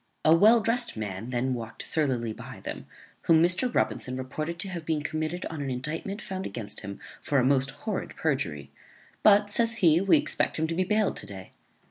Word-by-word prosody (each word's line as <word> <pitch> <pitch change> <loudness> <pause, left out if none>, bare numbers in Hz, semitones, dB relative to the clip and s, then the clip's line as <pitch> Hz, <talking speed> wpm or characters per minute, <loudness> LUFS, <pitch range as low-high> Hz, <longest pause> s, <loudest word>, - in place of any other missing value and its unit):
A 155 - +7
well 220 +6 +6
drest 235 - +1
man 105 +1 -5
then 125 +1 0
walked 115 -2 -4
surlily 125 -8 0
by - - -10
them, - - -7 0.4
whom 165 -1 +6
Mr. 185 +8 +2
Robinson 130 - -1
reported 155 +6 -4
to 190 +3 -3
have 170 -3 -5
been 155 -2 -1
committed 155 +4 -3
on 160 -3 -5
an 140 - -3
indictment 155 - -4
found 190 0 -4
against 105 -3 -5
him 100 0 -7 0.2
for 145 - 0
a 130 - +4
most 135 0 +3 0.2
horrid 210 -4 -3
perjury; 80 - -2 0.5
but, 205 0 +5
says 230 +1 +1
he, 170 -4 +4
we 195 +10 +5
expect 295 - 0
him 160 - +1
to 165 - -2
be 185 +3 +1
bailed 210 +2 +1
today. 95 -2 -8
155 Hz, 190 wpm, -27 LUFS, 125-195 Hz, 0.5 s, A